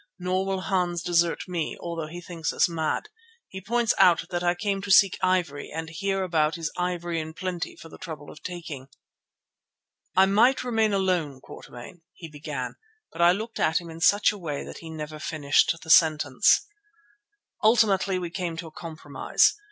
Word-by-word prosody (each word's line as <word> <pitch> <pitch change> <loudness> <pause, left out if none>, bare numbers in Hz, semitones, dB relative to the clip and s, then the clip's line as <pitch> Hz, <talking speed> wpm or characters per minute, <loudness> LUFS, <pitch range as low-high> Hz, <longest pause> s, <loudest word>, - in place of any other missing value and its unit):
Nor 185 +1 -1
will 190 -1 -1
Hans 180 -2 -1
desert 170 -1 +1
me 175 -3 -3
although 165 -2 -5
he 175 +3 -8
thinks 165 -3 -4
us - - +3
mad. 165 - -2 0.4
He 190 - -8
points 230 +3 +1
out 175 -2 +5
that 175 -1 -1
I 175 0 +2
came 195 +1 -2
to 205 - -7
seek 195 -1 +6
ivory 180 -6 0
and 160 0 -6
here 195 +3 -1
about 160 -3 +1
is 165 -2 -3
ivory 175 -2 -2
in 160 0 -6
plenty 180 -2 -4
for - - -12
the - - -13
trouble 155 -5 -8
of 155 - -14
taking." 165 -7 -7 1.3
"I 190 - +6
might 225 +8 +3
remain 225 -3 +1
alone, 180 -8 0
Quatermain——" 130 +6 -12
he 165 - -10
began, 145 -4 -6 0.3
but 165 - -5
I 170 0 +7
looked 220 +5 -4
at 160 0 +2
him 170 -2 -10
in 165 +1 -10
such 205 +5 +5
a 210 - -9
way 150 -5 -4
that - - -9
he 165 - -10
never 155 -1 -7
finished 150 0 +2
the 160 - -2
sentence. 155 -6 +4 1.0
Ultimately 205 -4 +3
we 175 -2 -4
came 175 -3 -4
to 170 - -5
a 160 - -10
compromise. 155 -3 0
175 Hz, 180 wpm, -26 LUFS, 160-190 Hz, 1.3 s, I